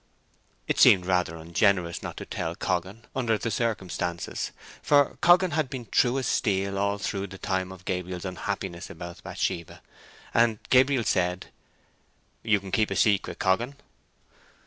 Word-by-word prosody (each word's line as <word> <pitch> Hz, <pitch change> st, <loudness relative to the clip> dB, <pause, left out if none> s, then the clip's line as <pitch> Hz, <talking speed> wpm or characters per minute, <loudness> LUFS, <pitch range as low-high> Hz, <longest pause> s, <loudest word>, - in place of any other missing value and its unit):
It -, -, 0 dB
seemed 90 Hz, -2 st, +7 dB
rather 90 Hz, -3 st, +1 dB
ungenerous 85 Hz, +2 st, +1 dB
not -, -, -7 dB
to -, -, -6 dB
tell -, -, -4 dB
Coggan, 95 Hz, +6 st, -2 dB
under 120 Hz, -4 st, +1 dB
the 115 Hz, -, -3 dB
circumstances, 95 Hz, -6 st, -2 dB, 0.3 s
for 145 Hz, -2 st, +3 dB
Coggan 180 Hz, +1 st, +5 dB
had 155 Hz, -3 st, 0 dB
been 130 Hz, -3 st, -6 dB
true 125 Hz, +1 st, +3 dB
as 130 Hz, -, -1 dB
steel 100 Hz, -3 st, 0 dB
all 100 Hz, 0 st, +1 dB
through 100 Hz, -1 st, -3 dB
the 95 Hz, +1 st, -10 dB
time 95 Hz, -1 st, -2 dB
of 95 Hz, -1 st, -12 dB
Gabriel's 90 Hz, 0 st, -3 dB
unhappiness 85 Hz, -1 st, -4 dB
about 85 Hz, -2 st, -9 dB
Bathsheba, 85 Hz, -1 st, -4 dB, 0.5 s
and 115 Hz, -2 st, +3 dB
Gabriel 130 Hz, -1 st, +5 dB
said, 90 Hz, -2 st, 0 dB, 0.9 s
"You 110 Hz, -2 st, +2 dB
can 95 Hz, -1 st, -10 dB
keep 110 Hz, +1 st, +2 dB
a -, -, -2 dB
secret, 100 Hz, -3 st, +2 dB
Coggan?" 115 Hz, +8 st, +1 dB
100 Hz, 145 wpm, -27 LUFS, 90-115 Hz, 0.9 s, seemed